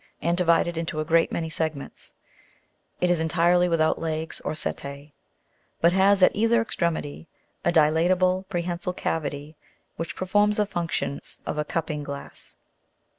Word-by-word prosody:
and 170 +2 +1
divided 170 -1 +2
into 160 -2 -3
a 155 - -1
great 165 +1 +3
many 165 -1 -2
segments: 155 -3 -4 0.8
it 180 0 +2
is 175 - +2
entirely 175 +2 +3
without 160 -2 +2
legs 160 0 -3
or - - -2
setse, 140 0 -5 0.7
but 170 +1 +4
has 195 0 +4
at - - +5
either 230 +2 +3
extremity, 170 -8 -2 0.4
a 175 - +2
dilatable, 175 +4 +3
prehensile 175 0 -2
cavity, 150 -3 -3 0.4
which 165 - -4
performs 205 +3 +2
the 210 - +2
functions 170 -6 -3
of 150 - -3
a - - +1
cupping 155 -1 -3
glass. 140 -1 -8
165 Hz, 140 wpm, -25 LUFS, 155-180 Hz, 0.8 s, at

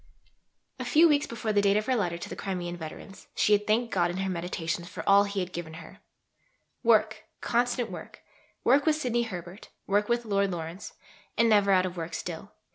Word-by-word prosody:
A - - -3
few 300 +7 +5
weeks 290 -2 +2
before 225 -2 -3
the 205 - +4
date 200 0 +3
of 215 - 0
her 260 - +1
letter 175 -7 -1
to - - -7
the - - -7
Crimean 180 -3 -4
veterans, 170 +4 -10
she 210 - +3
had 210 0 +2
thanked 230 +2 +1
God 175 -2 +2
in 175 - -4
her 190 0 -1
meditations 170 -1 -3
for - - -8
all 200 +1 +6
he 200 -1 -2
had 180 0 -5
given 160 -2 -6
her 165 -1 -12 0.8
"work, 220 -2 +2
constant 245 0 0
work, - - -10 0.4
work 280 +5 +4
with 310 - +4
Sidney 245 -6 0
Herbert, 185 -3 -7 0.2
work 205 +2 +1
with 235 0 +1
Lord 200 -2 +1
Lawrence, 170 +2 -6 0.4
and 230 - +4
never 205 -2 +4
out 185 -1 +4
of 180 -1 -5
work 165 0 -4
still." 175 +3 -6
200 Hz, 200 wpm, -28 LUFS, 175-230 Hz, 0.8 s, all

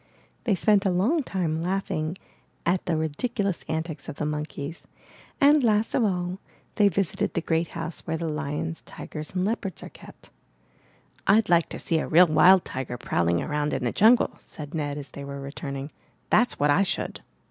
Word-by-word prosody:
They 215 -5 +3
spent 200 +2 +3
a 195 - +2
long 210 - +2
time 170 - -2
laughing 180 -2 -2 0.5
at 175 +2 +1
the 165 -3 +1
ridiculous 195 - -2
antics 160 -2 -4
of - - -5
the 150 - -3
monkeys, 150 +1 -5 0.5
and, 290 +1 +6
last 215 -1 +2
of 245 - +3
all, 180 -2 -1 0.3
they 205 - +4
visited 195 -1 0
the 170 - +1
great 165 0 0
house 165 0 -4
where 160 0 -1
the 165 0 -3
lions, 155 +1 -3
tigers, 155 +3 -8
and 185 0 +1
leopards 205 -3 -2
are - - -8
kept. - - -15 1.0
'Td 215 0 +4
like 170 -1 +4
to - - -6
see 165 - 0
a - - -2
real 175 +3 +7
wild 180 +3 +6
tiger 130 -2 -4
prowling 85 -5 0
around 150 0 -1
in - - -2
the 120 - 0
jungle,'' 230 +4 +4
said 145 -2 -9
Ned 145 -3 -2
as 140 -3 -8
they 140 - -7
were 140 0 -6
returning. 140 0 -6 0.4
''That's 240 +3 +4
what 145 0 +3
I 180 - +3
should!" 195 - -2
165 Hz, 180 wpm, -26 LUFS, 150-195 Hz, 1.0 s, real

